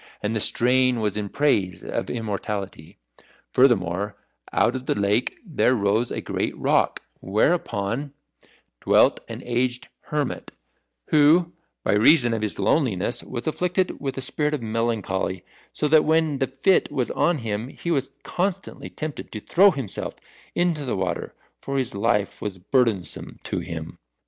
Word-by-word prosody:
And 105 +2 -1
the - - +1
strain 125 +3 +3
was 105 -3 -1
in 105 -1 -3
praise 100 -12 +1
of - - -3
immortality. 100 -6 -4 0.5
Furthermore, 105 -6 +2 0.4
out 120 - +2
of 130 0 -5
the - - +1
lake 100 +4 +1
there 145 -7 +2
rose 105 +2 +1
a - - -3
great - - -3
rock, - - +1 0.2
whereon 115 - 0 0.7
dwelt - - +4
an - - -7
aged 125 +1 -1 0.2
hermit, 150 -3 -2 0.6
who 160 +3 +5 0.3
by - - +2
reason 120 +3 +5
of 110 - -1
his 105 -2 -2
loneliness 120 - +1
was 120 - -6
afflicted 180 +3 0
with 135 -2 -3
a - - -2
spirit 150 +3 0
of 130 - -6
melancholy; 110 -5 -1 0.3
so 150 - -1
that 155 0 +6
when 160 -3 +2
the 135 - +1
fit 135 +8 +2
was 130 -4 -1
on 175 -2 +2
him, 110 -2 -3
he 170 +5 -5
was 135 -4 0
constantly 190 +1 -3
tempted 155 -2 -6
to 105 - -5
throw 190 - +5
himself 135 - -4 0.4
into 175 -4 +1
the 125 -7 -2
water, 90 -2 -3 0.2
for 140 0 -3
his 130 -3 -1
life 105 -1 0
was 100 -3 -4
burdensome 105 - 0
to - - -2
him. 80 -1 -7
120 Hz, 150 wpm, -24 LUFS, 105-150 Hz, 0.7 s, that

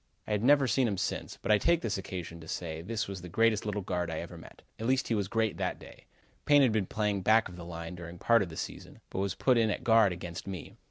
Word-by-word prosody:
I - - -6
have 105 -1 +1
never 140 +3 +5
seen 130 0 +2
him 100 -3 -1
since, 100 - -3
but - - +1
I 105 - +6
take 170 +5 +3
this 110 -3 -1
occasion 90 -3 -6
to 80 - -11
say 80 -1 -4
this 115 +5 -3
was 95 -2 -6
the 90 - -8
greatest 110 +2 +2
little 105 -1 -2
guard 90 -2 -2
I 80 - -3
ever 85 +1 -7
met. 80 - -13 0.2
At 115 - -2
least 130 0 +1
he - - +2
was 100 -3 0
great 110 0 0
that - - -2
day. - - -14 0.4
Payne 145 -1 +6
had 125 - +4
been 105 -4 0
playing 105 -2 -1
back 110 +4 +4
of 90 - -11
the 90 - -8
line 85 0 -6
during 85 0 -8
part 115 +5 +4
of 95 - -2
the 80 - -9
season, - - -7
but - - -3
was 100 0 -1
put 125 -3 +3
in 110 -1 +3
at - - -2
guard 115 -4 +5
against 85 0 -6
me. 95 -5 -6
100 Hz, 275 wpm, -30 LUFS, 90-115 Hz, 0.4 s, I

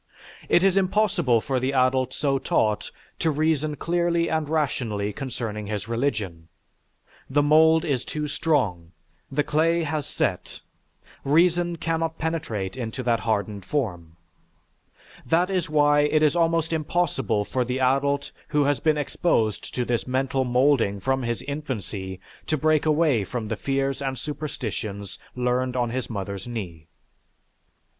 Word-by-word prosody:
It 175 - +4
is 195 0 +4
impossible 185 - +2
for 130 +1 -1
the 130 +2 -1
adult 130 -1 +2
so 135 0 0
taught 105 -4 0 0.3
to 165 - +2
reason 155 0 +1
clearly 170 +1 0
and 155 -2 -1
rationally 115 -10 -1
concerning 115 -4 -5
his 105 0 -4
religion; 110 -9 -2 0.8
the 145 +2 +3
mould 160 +2 +5
is 140 -6 0
too 150 0 -4
strong, 105 - 0 0.4
the 145 +2 +1
clay 165 +3 +2
has 150 -2 -2
set, - - -2 0.6
reason 170 +3 +3
cannot 165 0 -2
penetrate 155 - -3
into 125 0 -4
that 115 -2 +2
hardened 105 -2 -1
form. 90 - -3 1.1
That 170 +8 +2
is 185 -3 -1
why 145 -1 +4
it 150 +1 +3
is 155 +2 +3
almost 165 -1 +1
impossible 155 -9 0
for 130 +3 0
the 125 +2 -2
adult 140 +2 +1 0.2
who 150 -1 +2
has 145 0 +1
been 155 -1 +2
exposed 115 - 0
to 125 - 0
this 120 -5 -1
mental 130 +1 0
moulding 125 -5 +2
from 130 +6 0
his 120 -1 -2
infancy 105 -10 -5 0.3
to 155 - +1
break 155 +1 +2
away 150 -8 +3
from 110 +3 -4
the 110 - -1
fears 135 +3 -1
and 135 -1 -2
superstitions 110 -9 -5 0.2
learned 125 0 0
on 120 -2 0
his 130 +1 -3
mother's 100 -2 -5
knee. 90 -9 -6
135 Hz, 140 wpm, -25 LUFS, 115-155 Hz, 1.1 s, mould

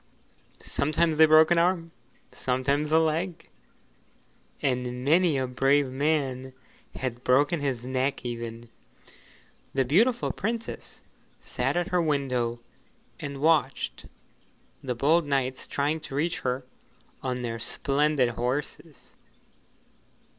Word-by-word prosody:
Sometimes 155 +2 0
they 160 0 +7
broke 155 +1 +6
an 170 - +5
arm, 170 -1 +1 0.4
sometimes 140 +4 -1
a 160 - +5
leg, 160 +2 -1 1.1
and 125 -1 -2
many 165 0 +4
a 130 - 0
brave 135 +2 +2
man 130 -2 -1 0.4
had 125 -2 -4
broken 145 +6 +3
his 130 -4 -2
neck 130 +1 -1
even. 115 -1 -5 1.1
The 135 -1 +2
beautiful 230 - +2
Princess 230 +2 -5 0.4
sat - - -2
at 175 +1 -1
her 180 -2 +2
window 125 -6 -1 0.6
and 140 -1 -6
watched 160 0 +1 0.7
the 125 -2 -3
bold 150 +6 +3
knights 130 -2 -1
trying 145 +3 -1
to 145 -3 -8
reach 165 +5 0
her 125 0 -2 0.6
on 125 -1 -3
their 115 -1 -3
splendid 140 +2 +1
horses. 130 +5 -4
140 Hz, 110 wpm, -27 LUFS, 125-160 Hz, 1.1 s, they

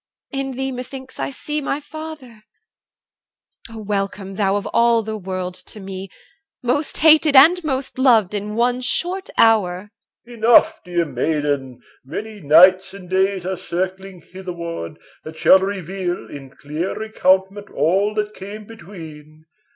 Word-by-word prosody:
in 270 -1 -3
thee 265 0 -2
methinks 260 +1 -8
I 135 0 -2
see 300 - -4
my 280 0 -2
father. 300 -7 -10 1.3
O 225 - -10
welcome! 200 -2 -3
thou 195 0 +1
of 205 - -2
all 235 -1 +3
the 220 0 -4
world 185 -2 -4
to 185 +3 -9
me 190 0 -7 0.5
Most 275 +5 0
hated 310 -2 +5
and 335 +7 +7
most 265 -3 -3
loved 225 -7 +4
in 210 +1 -4
one 245 +2 +1
short 360 +9 -2
hour. 205 -3 +3 0.4
OLD 240 - -11
M. - - -12
Enough, 235 0 +5
dear 175 -2 -1
maiden! 145 -2 -2 0.2
Many 210 +10 -7
nights 185 +6 +5
and 185 -2 -12
days 190 -1 +1
Are 190 0 -2
circling 185 0 -5
hitherward, 170 - -7 0.3
that 160 0 -10
shall 190 - +6
reveal 190 -2 -4
In 135 -2 -9
clear 150 +6 -5
recountment 200 -2 0
all 195 +8 +1
that 210 0 -2
came 205 +2 -9
between. 160 -7 -12
195 Hz, 145 wpm, -20 LUFS, 180-235 Hz, 1.3 s, and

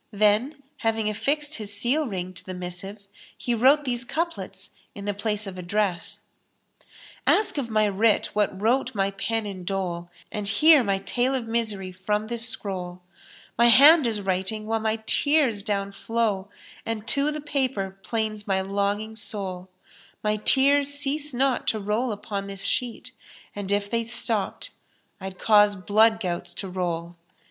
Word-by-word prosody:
Then, 215 +7 +1
having 220 -2 0
affixed 295 +7 -1
his 210 -2 -6
seal 245 +9 0
ring 185 -3 -4
to 185 - -10
the 185 - -7
missive, 180 +3 -6 0.3
he 245 - -1
wrote 270 +6 +4
these 245 -1 -1
couplets 335 +7 -4 0.2
in 200 - -7
the 205 - -1
place 210 +1 -2
of 185 -2 -7
address, 180 -2 -2 1.1
"Ask 420 -8 +3
of 245 -4 -4
my 215 -1 +2
writ 205 +2 +2
what 205 -2 0
wrote 245 +3 +1
my 195 0 +1
pen 225 +3 -2
in 190 -3 -6
dole, 175 -2 -3
* - - -29
And 210 -1 -4
hear 295 +7 +6
my 200 -3 +1
tale 245 +7 0
of 250 -3 -2
misery 215 -5 -1
from 210 +3 -2
this 235 +1 +1
scroll; 180 -4 -4 0.6
My 235 - +7
hand 280 +4 +8
is 215 -3 0
writing 190 +3 -2
while 225 +1 0
my 220 0 -2
tears 285 -6 +2
down 200 -1 -2
flow, 205 -1 -1 0.2
* - - -20
And 225 -1 -4
to 285 0 +3
the 305 - -4
paper 265 -10 -2
'plains 215 -1 -3
my 190 -1 +1
longing 200 +3 -2
soul: 190 -4 -3 0.5
My 210 0 +1
tears 280 +5 +4
cease 285 +1 -2
not 260 0 0
to 220 - +1
roll 215 +5 -1
upon 200 -1 -5
this 195 -1 -4
sheet, 250 +1 -2 0.2
* - - -23
And 200 -1 -5
if 200 0 +1
they 230 +2 -1
stopped 230 - 0 0.5
I'd 190 -1 -7
cause 210 0 +5
blood 220 +4 +3
gouts 175 -3 -3
to 190 +1 -4
roll." 175 -2 -3
215 Hz, 165 wpm, -25 LUFS, 195-240 Hz, 1.1 s, hand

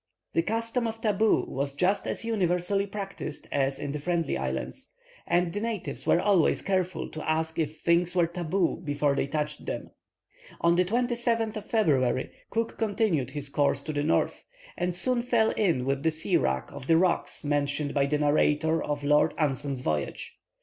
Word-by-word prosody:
The 165 - +3
custom 230 +5 -1
of 225 0 -5
"tabu" 215 -1 +2
was 140 +1 -3
just 185 +6 +1
as - - -3
universally 195 -2 +1
practised 195 -6 -6
as 135 -1 +1
in 145 - -4
the 150 - -3
Friendly 165 0 0
Islands, 65 0 -4 0.4
and 175 -1 +2
the 205 - -2
natives 225 -4 -3
were - - +5
always 195 -4 +3
careful 185 -2 -1
to 155 0 -5
ask 160 +1 0
if 155 0 -2
things 170 +1 +2
were 175 -2 +4
"tabu" 175 +1 -1
before 145 -3 0
they 140 - 0
touched 150 +1 -3
them. - - -4 0.7
On 170 0 +3
the 180 +1 +3
27th 235 0 0
of 215 -1 -6
February, 135 - +2 0.2
Cook 230 0 -2
continued 205 - +1
his 145 -2 -5
course 140 -1 +1
to 155 - -4
the 145 - 0
north, 155 +3 +1 0.3
and 180 -1 -1
soon 245 +6 +1
fell 235 -2 +2
in 170 -12 +1
with 135 0 0
the 160 - +3
sea 155 0 -1
wrack 65 0 0
of 140 -1 -9
the 165 - +5
rocks 180 -1 +1
mentioned 145 0 0
by 140 -1 +2
the 150 +1 +1
narrator 150 +2 +2
of 145 -1 -3
Lord 150 +1 +3
Anson's 140 -3 -1
voyage. 75 - -2
165 Hz, 175 wpm, -28 LUFS, 145-200 Hz, 0.7 s, were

